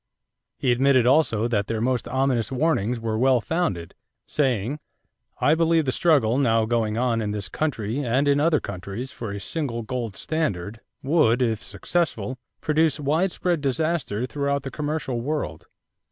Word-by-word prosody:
He 130 - +1
admitted 130 0 +4
also 125 -5 +3
that 105 -4 0
their 115 -1 -2
most 125 +1 0
ominous 130 -3 0
warnings 125 -5 +1
were 110 -1 -2
well 130 0 +4
founded, 105 - -2 0.3
saying: 130 -1 0 0.6
"I 145 - +4
believe 165 -1 +3
the 130 - +1
struggle 135 -7 +3
now 115 -4 +3
going 110 -1 0
on 120 -2 +1
in 105 - -2
this 100 -2 -3
country 115 - -2
and 135 +1 +1
in 140 0 +4
other 155 0 +3
countries 100 +6 -6
for 115 -4 -6
a 100 - -5
single 120 - -3
gold 115 -3 -4
standard 110 - -2 0.2
would, 135 -5 +3
if 115 -3 -1
successful, 130 +2 -2 0.2
produce 155 0 +2
widespread 165 +3 0
disaster 140 -5 -1
throughout 140 +1 -1
the 135 - -5
commercial 145 -5 -2
world. 140 - -3
130 Hz, 155 wpm, -24 LUFS, 115-150 Hz, 0.6 s, admitted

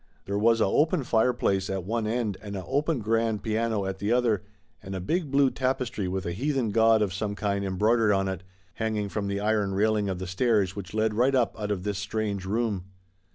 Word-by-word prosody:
There 100 +1 -1
was 115 +1 +4
a - - +5
open 150 - +2
fireplace 110 -5 +1
at 95 -1 -2
one 110 +3 -1
end 110 -3 -1
and 100 -1 -6
a 95 - -5
open 145 0 0
grand 115 -1 0
piano 110 -2 0
at 95 0 -4
the 105 +2 -1
other, 120 -5 +2 0.4
and 95 -1 -6
a - - -2
big 155 - -1
blue 140 -1 +3
tapestry 125 -6 -1
with 95 0 -3
a 85 - -2
heathen 130 +3 -1
god 110 0 +4
of 95 -3 -2
some 100 +1 -3
kind 100 -1 -1
embroidered 105 +3 +2
on 95 -1 +1
it, 95 -2 -3 0.3
hanging 110 -1 -2
from 100 0 -3
the 100 0 -1
iron 105 -2 0
railing 105 0 +2
of 95 - -2
the 95 - -5
stairs 100 0 +1
which 100 0 -7
led 110 0 +1
right 125 +5 +2
up 115 -7 +1
out 105 -1 -3
of 100 -3 -2
this 100 -1 -2
strange 105 -2 -2
room. 105 -3 -1
105 Hz, 215 wpm, -27 LUFS, 100-115 Hz, 0.4 s, a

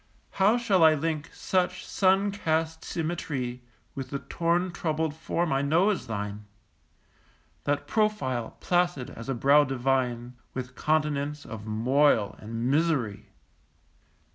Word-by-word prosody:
How 205 +5 +3
shall 205 -8 +3
I 160 -1 +7
link 155 0 -2
such 180 -1 -1
sun 195 +1 +2
cast 160 -4 -1
symmetry 145 -7 -3 0.3
With 135 -1 -6
the 140 - -2
torn 175 +5 0
troubled 160 -2 -1
form 160 +1 -1
I 135 - +2
know 165 +8 +3
as 200 - -4
thine, 105 -1 -4 1.2
That 145 0 0
profile, 190 - -1
placid 175 -7 0
as 115 +4 -9
a 135 - 0
brow 140 +5 +5
divine, 125 -2 -1 0.2
With 130 0 -5
continents 150 -1 0
of 110 -2 -8
moil 115 0 +2
and 115 +2 -4
misery? 140 -10 0
150 Hz, 125 wpm, -27 LUFS, 125-170 Hz, 1.2 s, I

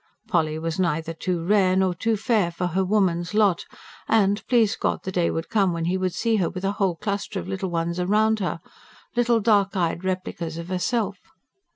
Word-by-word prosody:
Polly 155 -3 +1
was 165 +2 -3
neither 165 -2 0
too 170 0 -3
rare 190 -1 +3
nor 190 -1 +2
too 220 +5 0
fair 215 -4 +1
for 170 +2 -3
her 180 +2 0
woman's 185 -2 +1
lot; 205 -5 +3 0.4
and, 205 -2 +2
please 225 -4 +3
God, - - -1
the 190 - -4
day 175 -2 +1
would 165 +1 -3
come 195 -5 +2
when 165 -1 -2
he 180 +2 0
would 185 -1 -1
see 230 -1 +1
her 180 -4 +1
with 185 +1 -5
a 195 - +1
whole 195 -4 0
cluster 200 +1 -3
of - - -7
little 190 0 -3
ones 170 +1 -1
round 215 +3 +2
her 175 -4 -2 0.5
little 240 -1 +3
dark 205 -3 +2
eyed 170 0 0
replicas 185 -3 -3
of 170 +1 -7
herself. 190 +2 -1
185 Hz, 200 wpm, -24 LUFS, 170-205 Hz, 0.5 s, rare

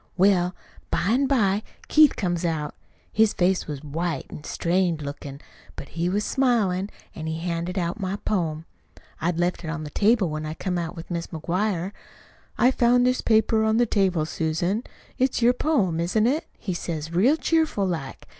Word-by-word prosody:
Well, 185 -1 +3 0.3
by 180 - 0
an' 265 +5 +3
by 210 -7 +2 0.3
Keith 305 -2 +6
comes 175 -3 -1
out. 155 -3 -1 0.4
His 220 -1 +4
face 185 +1 +1
was 150 -2 -6
white 160 0 -2
an' 150 - -8
strained 175 -3 0
lookin'. 140 -1 -7 0.4
But 140 - -8
he 170 +2 -1
was 205 +3 0
smiling, 210 -8 +1 0.2
an' 160 0 -6
he 160 0 -2
handed 170 +2 -3
out 175 +2 -1
my 190 -1 -2
poem 165 -7 -2 0.6
I'd 170 0 0
left 175 +1 0
it 160 - -4
on 160 -1 -4
the 150 - -7
table 210 +1 +3
when 155 0 -3
I 155 +1 -4
come 180 +1 -2
out 165 -2 -4
with 165 +2 -9
Mis' 170 -1 -2
McGuire. 180 +3 -1 0.7
'I 250 - +5
found 245 0 +4
this 255 0 +2
paper 220 0 +3
on 220 0 +2
the 240 - +4
table, 190 -7 +1
Susan. 170 +7 -1 0.4
It's 255 -2 +1
your 245 +1 +6
poem, 230 - +1
isn't 180 +6 +1
it?' 290 +7 +1
he 190 - -4
says 165 -2 -4
real 240 - +4
cheerful 320 -12 +1
like. 160 -8 -4
180 Hz, 180 wpm, -25 LUFS, 165-220 Hz, 0.7 s, Keith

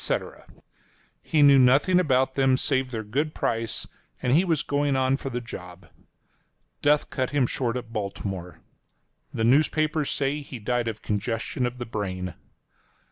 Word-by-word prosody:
He 150 -2 +2
knew 140 -1 +7
nothing 140 +9 +5
about 130 -6 +2
them 135 -1 +3
save 130 -1 0
their 115 -3 -4
good 145 +9 -2
price, 115 -1 -2 0.3
and 125 - +1
he 165 +6 +5
was 165 -6 +1
going 145 -1 0
on 130 0 +2
for 135 - -5
the 125 -1 -3
job. 90 -6 -10 0.9
Death 150 +1 +2
cut 130 -2 -1
him 145 -3 +2
short 120 0 -1
at 115 -2 -8
Baltimore. 95 -4 -5 0.7
The 115 - -2
newspapers 155 +4 +2
say 140 +1 -1
he 140 -2 -8
died 120 +2 -1
of 110 -1 -5
congestion 115 +4 -2
of 120 +1 -7
the 120 - -5
brain. 95 -5 -4
125 Hz, 150 wpm, -25 LUFS, 115-145 Hz, 0.9 s, knew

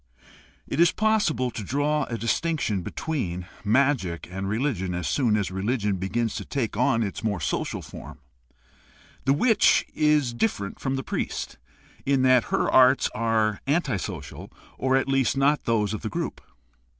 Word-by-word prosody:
It - - -4
is 170 0 +6
possible 205 - +1
to 110 - -6
draw 145 +6 0
a 115 - -4
distinction 115 - 0
between 90 - -3 0.2
magic 110 - +1
and 95 +1 -4
reli 125 +8 0
gion 90 -3 -4
as 85 -2 -3
soon 120 -6 +2
as 100 -3 -2
religion 100 +1 -1
begins 110 +5 -1
to - - -4
take 125 -7 -3
on 115 0 +2
its 100 +2 -5
more 105 -4 -1
social 70 - -2
form. - - -10 1.1
The 135 - +4
witch 220 - +4
is 150 -5 +2
dififerent 120 - -2
from 135 -1 -1
the 135 - -3
priest, - - -4 0.4
in 135 -1 +2
that 130 -2 +5
her - - 0
arts 130 +1 +5
are 110 -3 0
anti 140 - +1
social, - - -7 0.2
or 130 0 +1
at 135 - 0
least 135 -1 +1
not 145 +2 +2
those 110 -3 +1
of 110 - -4
the 110 - -3
group. - - -4
120 Hz, 160 wpm, -25 LUFS, 105-140 Hz, 1.1 s, is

